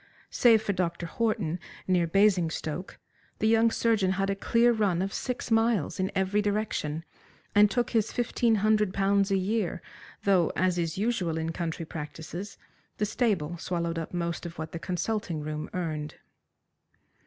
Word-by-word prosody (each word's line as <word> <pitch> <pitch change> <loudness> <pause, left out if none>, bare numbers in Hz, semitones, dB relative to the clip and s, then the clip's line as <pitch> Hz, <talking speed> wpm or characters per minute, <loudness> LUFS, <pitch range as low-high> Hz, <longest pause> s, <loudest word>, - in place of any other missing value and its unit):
Save 225 -3 +5
for 205 - 0
Dr. 175 -2 -2
Horton, 205 -4 -1 0.3
near 180 -2 +2
Basingstoke, 180 -3 +1 0.4
the 220 - +1
young 225 +1 +5
surgeon 220 -5 +2
had 195 +1 0
a - - -1
clear 235 +4 +3
run 205 -6 +1
of 195 +1 -2
six 250 -2 -4
miles 225 -8 +2
in 190 +1 0
every 190 +2 +2
direction, 200 -7 -2 0.5
and 205 -1 +6
took 245 +2 0
his 225 -3 +1
fifteen 240 -1 +1
hundred 215 -3 +2
pounds 195 0 +2
a 195 - +2
year, 190 -1 -1 0.4
though, 185 -5 +3
as 180 -1 +1
is 165 -1 -2
usual 195 -7 0
in 160 0 -2
country 165 -1 -4
practices, 160 +5 -7 0.4
the 210 - +1
stable 195 -8 0
swallowed 170 -1 -2
up 165 - -5
most 170 -1 -2
of 170 -1 -7
what 160 0 -5
the 165 - -5
consulting 180 0 -2
room 150 0 -4
earned. 155 -4 -3
190 Hz, 155 wpm, -28 LUFS, 170-215 Hz, 0.5 s, and